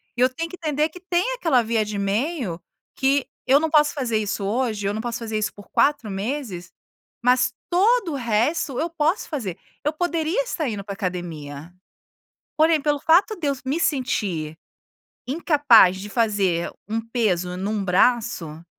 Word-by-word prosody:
E 245 - -2
eu 255 - +5
tenho 330 +6 -4
que 365 - -8
entender 305 -1 0
que 360 - -12
tem 365 +7 0
aquela 315 - +2
via 225 -1 +1
de 210 -1 -5
meio, 205 - -1 0.3
que 270 0 +1 0.2
eu 275 +2 +6
não 320 0 0
posso 300 -1 +4
fazer 245 -6 -1
isso 205 -1 -3
hoje, 215 -2 -1
eu 200 - 0
não 220 - -3
posso 240 0 -4
fazer 220 -2 -3
isso 210 0 -1
por 205 - -15
4 280 -7 +2
meses, 200 -2 -4 0.5
mas 255 +1 +3 0.2
todo 390 -1 +3
o - - -2
resto 245 +4 0
eu 335 +2 -1
posso 330 +3 0
fazer. 210 - -4 0.3
Eu 300 - +1
poderia 335 +5 0
estar 315 - -2
indo 200 -2 -4
para 200 0 -6
a - - -9
academia. 170 -5 -5 0.8
Porém, 315 -1 +4
pelo 295 -1 +1
fato 365 +9 +4
de 305 -4 -2
eu 280 - +2
me 285 +6 -1
sentir 195 - -1 0.7
incapaz 275 - +5
de 210 - -7
fazer 200 -6 +1 0.2
um 225 +1 -1
peso 215 -7 0
em 185 +2 -3
um 210 -1 -1
braço, 180 -6 +1
245 Hz, 175 wpm, -23 LUFS, 200-305 Hz, 0.8 s, eu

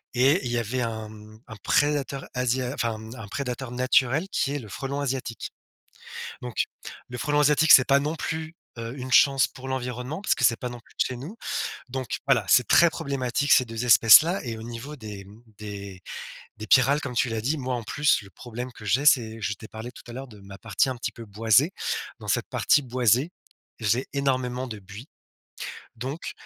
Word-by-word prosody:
et 135 +9 +4
il 120 - -2
y 120 - 0
avait 120 +2 -2
un, 110 -2 -4
mmh, 110 0 -13
un 110 - -9
prédateur, 140 +4 0
asia 125 0 0
enfin, 115 -5 -2
mmh, 110 +2 -10
un 115 -5 -9
prédateur 130 +1 -4
naturel, 130 +5 +2
qui 140 - 0
est 145 - -2
le 115 - -10
frelon 140 +5 -4
asiatique. 130 -4 -4 0.9
Donc 125 -4 -1 0.4
le 125 - -6
frelon 145 +3 +1
asiatique, 150 +2 +5
c'est 130 - +9
pas 140 -1 +5
non 150 +3 -2
plus, 160 0 -4 0.2
heu, 115 +1 -5
une 130 +1 -6
chance 135 -2 +5
pour 130 +1 -10
l'environnement, 125 +3 -4
parce 205 - +2
que - - -2
c'est 115 -1 +4
pas 125 - -3
non 120 0 -8
plus - - -24
de - - +5
chez 125 - -5
nous, 155 - -8 0.5
donc 130 -2 -3
voilà, - - +3
c'est - - +5
très 170 - +6
problématique, 140 -1 -2
ces 130 - +6
2 115 +1 -4
espèces-là 125 - +7
et 115 -3 -4
au 110 - -8
niveau 120 +6 -7
des, 105 -4 -8
mmh, 105 +4 -16 0.2
des 100 -3 -8 0.6
des 110 0 -7
pyrales, 135 +6 +4
comme 125 - -5
tu 125 - +2
l'as 115 -1 -2
dit, 140 +8 0
moi, 130 -2 -2
en 120 - -4
plus, 145 +4 +2
le 100 - -14
problème 125 +3 -7
que 110 -3 -13
j'ai, 125 +9 +1
c'est 115 -6 +3
je 105 - -1
t'ai 110 +2 -12
parlé 110 +3 -8
tout - - -14
à - - -8
l'heure 135 +2 -7
de 105 -4 -14
ma 100 0 -11
partie 110 +4 0
un 130 - -3
petit 120 - -4
peu 115 - -10
boisée, 110 - +3 0.5
dans - - -10
cette - - 0
partie 150 - +3
boisée, 125 - +2 0.5
j'ai 115 +4 +1
énormément 130 -2 -1
de 110 -4 -7
buis, 105 +6 -11 0.9
donc, 135 +7 -5
125 Hz, 205 wpm, -25 LUFS, 110-135 Hz, 0.9 s, c'est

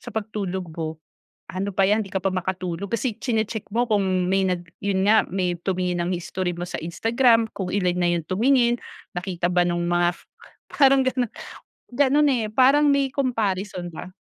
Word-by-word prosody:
sa - - -9
pagtulog 200 -4 -4
ko 160 -1 -4 0.6
ano 190 +2 -2
pa 195 0 +2
yan 210 +3 +3
hindi 195 - -10
ka 190 - -1
pa 190 0 -1
makatulog 185 0 -3
kasi 230 0 -1
chine-check 220 -3 -2
mo 240 +3 +1
kung 210 -3 +2 0.2
may 190 +1 +2
nag 175 -1 -2 0.2
yun 195 -1 0
nga 220 +1 +6
may 180 -1 0
tumingin 180 -1 -1
ng 175 - -2
history 175 0 -3
mo 175 - -4
sa 175 - -5
Instagram, 225 +7 +2
kung 190 -2 -4
ilan 180 -2 0
na 175 - +2
yung 165 - -4
tumingin, 240 - +2 0.3
nakita 175 -1 -2
ba 180 - +3
nung 175 0 0
mga 175 0 +1
f - - -21 0.5
parang 275 -2 +5
ganun. 255 -2 0 0.6
Ganon 285 +3 +3
eh, 240 -5 0
parang 270 +5 +5
may 275 -1 +1
comparison 205 -9 -2
ba. 175 +2 -9
195 Hz, 180 wpm, -23 LUFS, 180-235 Hz, 0.6 s, nga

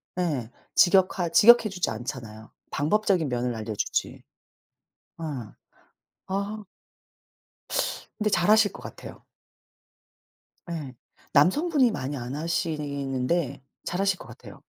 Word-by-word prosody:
네 150 -11 -1 0.3
직역하 185 -1 +4
직역해 230 +6 +7
주지 185 -2 -1
않잖아요. 110 -1 -7 0.2
방법적인 180 +1 +1
면을 125 -1 -1
알려 110 0 -4
주지. - - -2 1.0
어. - - -8 1.0
아. 200 +2 -3 1.6
근데 215 -1 +1
잘 175 0 +2
하실 215 -1 +5
것 - - -11
같아요. - - -10 1.5
예. 150 -6 -5 0.4
남성분이 265 - +4
많이 145 -7 -4
안 125 +2 -5
하시는데 145 -3 -2 0.2
잘 180 - -2
하실 195 -2 +2
것 - - -12
같아요. - - -12
165 Hz, 215 characters per minute, -26 LUFS, 130-195 Hz, 1.6 s, 직역해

